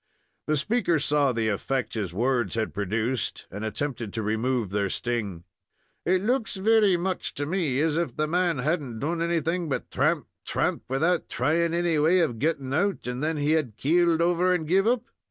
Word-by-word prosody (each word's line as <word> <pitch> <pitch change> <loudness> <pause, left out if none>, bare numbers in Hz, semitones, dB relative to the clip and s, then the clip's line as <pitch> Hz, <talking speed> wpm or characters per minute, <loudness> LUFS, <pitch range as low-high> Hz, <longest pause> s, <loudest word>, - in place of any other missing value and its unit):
The 155 0 +2
speaker 190 - +1
saw 145 -2 +2
the 115 -2 -1
effect 125 +5 -2
his 100 -6 -3
words 120 +2 0
had 110 -1 -1
produced, 110 +5 -2
and 100 +4 -6
attempted 115 -1 -3
to 110 - -2
remove 110 0 0
their 100 -1 0
sting. 105 -7 -3 0.6
"It 185 +1 +2
looks 240 0 0
very 205 -1 +4
much 185 +1 -3
to 145 - -2
me 155 -5 0
as 160 0 +1
if 170 0 -1
the 155 - 0
man 175 0 +1
had 155 +6 0
n't 120 -5 -7
done 165 +5 -2
anything 170 0 0
but 135 - -3
thramp, - - +1 0.2
thramp, - - -1
without 160 +7 +1
thrying 165 +6 +1
any 170 -2 +1
way 160 +5 +4
of 120 -9 -1
getting 140 -3 -1
out, 195 +6 0
and 125 +3 -3
then 160 0 0
had 145 -6 0
keeled 170 +2 +3
over 175 +1 +2
and 160 -3 -3
give 195 +5 +3
up." 240 0 +2
150 Hz, 185 wpm, -26 LUFS, 120-175 Hz, 0.6 s, very